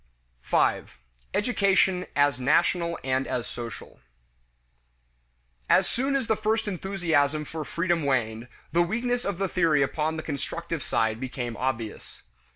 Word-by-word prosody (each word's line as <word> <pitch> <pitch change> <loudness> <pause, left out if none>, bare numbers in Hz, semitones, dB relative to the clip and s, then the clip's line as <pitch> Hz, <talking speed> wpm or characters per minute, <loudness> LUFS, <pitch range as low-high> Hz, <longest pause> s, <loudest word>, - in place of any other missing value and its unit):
5. - - +1 0.4
Education 195 -4 +2
as 145 -3 +3
National 170 +5 +2
and 130 0 0
as 120 -2 -2
Social. 120 -1 -8 1.7
As - - +5
soon 270 +3 0
as 270 -3 +1
the 220 - +2
first 220 +1 0
enthusiasm 165 -6 0
for 160 +1 -5
freedom 170 +1 0
waned, 120 -4 0 0.2
the 170 - +3
weakness 240 +7 0
of 200 -3 -2
the 195 +1 0
theory 165 -6 +3
upon 155 +3 -1
the 155 - -4
constructive 165 +2 -4
side 110 -2 0
became 125 -2 -4
obvious. 115 -4 -4
160 Hz, 130 wpm, -26 LUFS, 130-190 Hz, 1.7 s, As